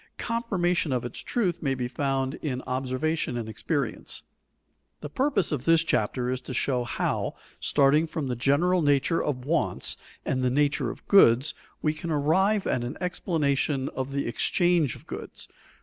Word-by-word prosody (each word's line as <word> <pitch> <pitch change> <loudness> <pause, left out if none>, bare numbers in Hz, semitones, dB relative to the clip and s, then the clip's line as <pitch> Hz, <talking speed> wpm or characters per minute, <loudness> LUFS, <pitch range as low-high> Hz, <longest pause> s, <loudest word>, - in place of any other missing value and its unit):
Confirmation 185 - 0
of 125 -2 -1
its 120 - -5
truth 190 -8 -1
may 135 -4 0
be 125 -1 -2
found 135 0 -1
in 130 -4 -3
observation 130 +2 -1
and 115 -2 -4
experience. 115 +4 -3 0.8
The 150 - -7
purpose 255 - +1
of 140 -4 -2
this 165 0 +5
chapter 125 -3 0
is 130 0 -2
to 130 0 -6
show 125 -1 +1
how, 120 - -2 0.2
starting 145 +3 +3
from 155 -2 -3
the 125 -2 -2
general 155 +9 +2
nature 145 +2 +2
of 130 -4 -3
wants 165 +4 0 0.3
and 130 - 0
the 125 - +3
nature 145 +3 +1
of - - -10
goods, 135 - +6 0.3
we 155 - +2
can 160 +2 -6
arrive 190 +8 +2
at 120 - 0
an 120 - -5
explanation 145 -6 0
of 130 +1 -4
the 140 0 -1
exchange 170 - +2
of - - -15
goods. - - -7
140 Hz, 165 wpm, -27 LUFS, 130-165 Hz, 0.8 s, goods